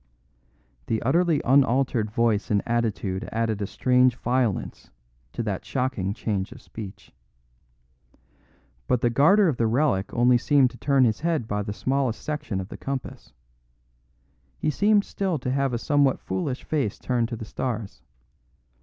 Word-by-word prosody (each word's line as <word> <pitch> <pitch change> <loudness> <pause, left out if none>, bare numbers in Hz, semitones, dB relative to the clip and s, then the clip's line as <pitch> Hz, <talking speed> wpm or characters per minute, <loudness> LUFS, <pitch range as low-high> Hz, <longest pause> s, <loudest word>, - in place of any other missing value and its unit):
The 110 - 0
utterly 165 +4 +2
unaltered 130 -4 +3
voice 110 -1 +1
and 105 -3 +1
attitude 110 -5 -1
added 110 -2 -1
a 100 - -1
strange 125 +1 +3
violence 120 -5 -1 0.4
to 120 - -3
that 100 -4 -3
shocking 125 -8 -2
change 100 -4 -2
of - - -11
speech. 100 -4 -10 1.8
But 125 - +1
the 120 - +2
guarder 190 - +5
of 145 -7 0
the 115 - +2
relic 120 -5 +1
only 120 +1 +4
seemed 135 -1 +3
to - - -13
turn 140 -2 +3
his 110 -4 +2
head 160 -7 -1
by 105 -1 -1
the 105 0 -4
smallest 130 +2 -1
section 150 -10 -3
of 95 +1 -6
the - - -8
compass. 135 -2 -6 1.2
He 155 - 0
seemed 205 +5 +3
still 190 -4 -2
to 125 -1 -3
have 135 0 +1
a 120 - -1
somewhat 140 +1 +2
foolish 125 +8 -3
face 140 -10 -1
turned 120 -2 -1
to 120 - -4
the 110 - -7
stars. 115 -3 -4
125 Hz, 155 wpm, -25 LUFS, 110-140 Hz, 1.8 s, guarder